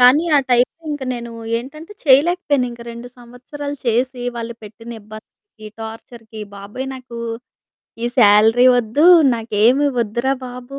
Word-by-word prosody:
కానీ 255 +7 +6
ఆ - - +6
టైంకింక 290 +4 0
నేను 235 -1 -7 0.3
ఏంటంటే, 305 - -10
చేయలేకపోయాను, 285 -1 +3
ఇంకా 235 0 -10
2 235 +1 -9
సంవత్సరాలు 255 +4 -8
చేసి, 245 +2 0
వాళ్ళు 235 0 -5
పెట్టిన 225 +2 -11
ఇబ్బందికి, 215 - -14
టార్చర్‌కి, 225 0 -10 0.2
బాబోయ్ 205 +7 -7
నాకు, 250 -2 -10 0.8
ఈ - - 0
సాలరీ 220 +3 +6
వద్దు, 245 +7 +1 0.3
నాకేమి 230 +5 +2
ఒద్దురా 235 +5 -1
బాబు! 250 +2 -9
245 Hz, 120 wpm, -19 LUFS, 225-270 Hz, 0.8 s, కానీ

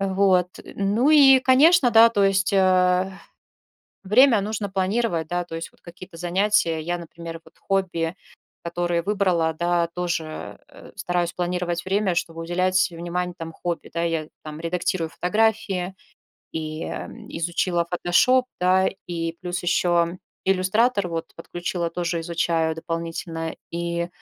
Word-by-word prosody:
Вот. 190 -2 +2 0.2
Ну 210 +9 0
и, 270 -3 +7
конечно, 265 +2 +5
да, 230 0 +8
то 205 -3 +1
есть, 195 -1 +2
э, 185 -1 +3 0.9
время 230 +4 +5
нужно 210 -1 -3
планировать, 190 -3 -1
да, 175 +1 -1
то 165 -1 -8
есть 165 - -6
вот - - -30
какие-то 170 -1 -12
занятия. 175 -1 +1
Я, 175 +2 -2
например, 165 0 -9
вот - - -21
хобби, 180 -4 -1 0.5
которые 175 0 -1
выбрала, 180 -4 +1
да, 170 +1 0
тоже, 170 -3 -4
э, - - -14
стараюсь 175 -3 -1
планировать 175 -1 -2
время, 190 -1 0
чтобы 165 -1 -3
уделять 185 +2 +1
внимание 175 +1 -3
там 165 0 -6
хобби, 170 +1 -5
да. 170 0 -1
Я 165 -2 -1 0.2
там 155 0 -8
редактирую 170 0 -2
фотографии 195 -1 0 0.6
и, 155 0 -4
м, - - -7
изучила 170 +1 -1
"Фотошоп", 250 +9 +3
да, 185 +1 +3 0.2
и 165 -1 -3
плюс 180 -1 -4
еще 175 0 +1 0.3
"Иллюстратор" 195 +2 +2
вот 165 -1 -4
подключила, 175 0 -4
тоже 170 -1 -2
изучаю 165 -1 0
дополнительно, 165 0 -4 0.2
и, 170 0 -2
175 Hz, 135 wpm, -23 LUFS, 170-195 Hz, 0.9 s, да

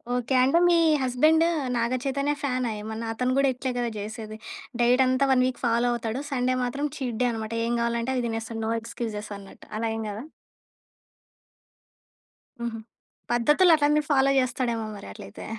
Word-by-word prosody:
Okay. 250 +2 -1
అంటే 275 +6 +3
మీ 345 - +5 0.3
husband 310 +6 +4 0.3
నాగ‌ 235 +2 0
చైతన్య 280 +1 0
ఫ్యానా 255 -3 0
ఏమన్న? 220 +1 -5
అతను 250 +3 0
గూడా 275 -1 +4
ఇట్లే 255 +1 -3
గదా! 240 -1 0
చేసేది. 215 +1 -7 0.4
డైట్ 250 +2 +5
అంతా 255 +2 +2
వన్ 255 -1 +4
వీక్ 255 - -4
ఫాలో 235 +1 +2
అవుతాడు. 235 +3 -3
సండే 255 -1 +1
మాత్రం 275 +4 -1
చీట్ 245 -4 -3
డే - - +3
అన్నమాట. 220 0 -5
ఏం 235 - 0
గావాలంటే 235 +2 -1
అది 250 - 0
తినేస్తాడు. 225 0 -4
నో 225 - -1
ఎక్స్‌క్యూజెస్ 215 -3 -5
అన్నట్టు. 195 -1 -14
అలా 225 0 -1
ఏం 225 - -3
గాదా? 215 +6 -6 2.4
హుహు. 235 -1 -3 0.5
పద్ధతులు 295 +9 +4
అట్లన్నీ 300 0 +3
ఫాలో 275 -1 +4
జేస్తాడేమో 240 -3 -1
మరి 200 - -10
అట్లైతే. 100 - -10
245 Hz, 160 wpm, -26 LUFS, 225-265 Hz, 2.4 s, మీ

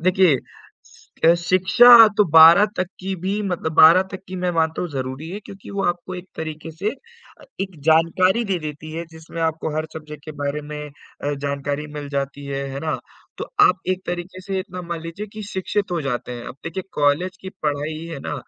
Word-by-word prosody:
देखिए 185 -3 +4 0.5
सि - - -23
अ, 170 - +7
शिक्षा 190 +7 +7
तो 210 - +5
12 165 +5 +9
तक 185 - 0
की 190 +1 -3
भी 195 +3 -1
मतलब 180 -5 -2
12 165 +4 +8
तक 190 - -6
की 185 - -6
मैं 180 - +2
मानता 160 0 0
हूँ 180 - -3
ज़रूरी 135 +3 -5
है 200 +3 -6
क्योंकि 195 -1 -11
वो 200 0 -2
आपको 175 +1 -2
एक 180 0 -9
तरीके 155 0 -6
से 185 +7 -2
अ, 470 - -17 0.2
एक 190 -5 -5
जानकारी 185 +7 +3
दे 195 -4 -1
देती 155 0 -7
है, 165 +1 -4
जिसमें 160 +1 -9
आपको 160 -1 -2
हर 155 0 -1
सब्जेक्ट 150 -2 -9
के 155 - -7
बारे 145 +1 -2
में 150 - -5
अ, 145 0 -7
जानकारी 140 +1 -3
मिल 145 -1 -6
जाती 140 +1 -3
है, 140 0 -3
है 135 - -5
ना? 155 - -1 0.4
तो - - -3 0.2
आप - - +5
एक 185 0 0
तरीके 175 +1 -5
से 190 +1 -3
इतना 185 -2 -7
मान 170 -1 -5
लीजिए 170 +6 -7
कि 215 - -7
शिक्षित 195 +1 -2
हो 170 - 0
जाते 125 -2 -3
हैं, 120 -1 -7
अब - - -7
देखिए 165 +3 -4
कॉलेज 150 +6 +1
की 190 - -7
पढ़ाई 150 +1 -2
है 165 -4 -6
ना, - - -4
165 Hz, 210 wpm, -22 LUFS, 150-185 Hz, 0.5 s, 12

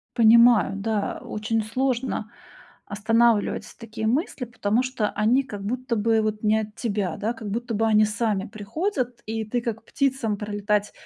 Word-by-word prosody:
Понимаю, 235 -3 +6
да, 205 0 -2
очень 215 +1 -2
сложно 250 -1 -2 0.5
останавливать 225 +1 +2
такие 220 -1 -4
мысли, 260 - -1
потому 230 -1 0
что 255 -5 -1
они 230 +6 +2
как 205 -6 -8
будто 245 +3 -2
бы 225 +1 +2
вот 215 0 -2
не 215 0 +3
от 210 0 -8
тебя, 205 -5 -2
да, 220 +3 -1
как 220 -3 -7
будто 235 +1 -3
бы 225 +2 +1
они 215 -1 +5
сами 215 -2 -1
приходят, 240 - -3
и 220 0 -2
ты, 240 +3 -2
как 225 -1 -4
птицам 260 -7 0
пролетать 205 0 -1
225 Hz, 155 wpm, -24 LUFS, 210-240 Hz, 0.5 s, Понимаю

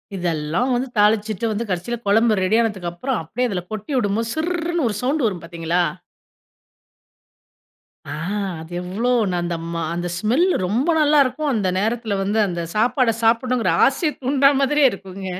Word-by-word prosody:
இதெல்லாம் 170 - -1
வந்து 255 +2 -1
தாளிச்சிட்டு 210 0 +2
வந்து 220 +2 -3
கடைசில 185 +6 -2
கொழம்பு 220 +2 +4
ரெடி 185 +4 +2
ஆனதுக்கு 195 -6 -2
அப்புறம் 255 +8 -2
அப்டியே 245 +9 -2
அதில 180 -3 -2
கொட்டி 215 +4 -6
விடும்போது 225 +1 0
சிர்ர்ருன்னு 340 -3 -1
ஒரு 210 - -3
சவுண்ட் 275 +3 0
வரும் 190 -6 -1
பாத்தீங்களா? 170 +1 -1 2.3
அ, - - -5 0.5
அது 160 +2 -11
எவ்ளோ 200 +8 -2 0.2
நான் 175 -1 -1
அந்த 170 -1 -2 0.2
மா 170 - -2
அந்த 175 +1 -3
ஸ்மெல் 235 - +2 0.2
ரொம்ப 235 - 0
நல்லாருக்கும். 295 -1 +3
அந்த 205 -4 0
நேரத்தில 220 +1 -1
வந்து 205 +3 0
அந்த 175 -1 -3
சாப்பாட, 240 +2 +2
சாப்பிடணுங்கிற 230 -4 +2
ஆசைய 300 +3 0
தூண்டுறா 275 +1 +4
மாதிரியே 280 +1 +4
இருக்குங்க! 195 0 -8
220 Hz, 150 wpm, -21 LUFS, 185-255 Hz, 2.3 s, கொழம்பு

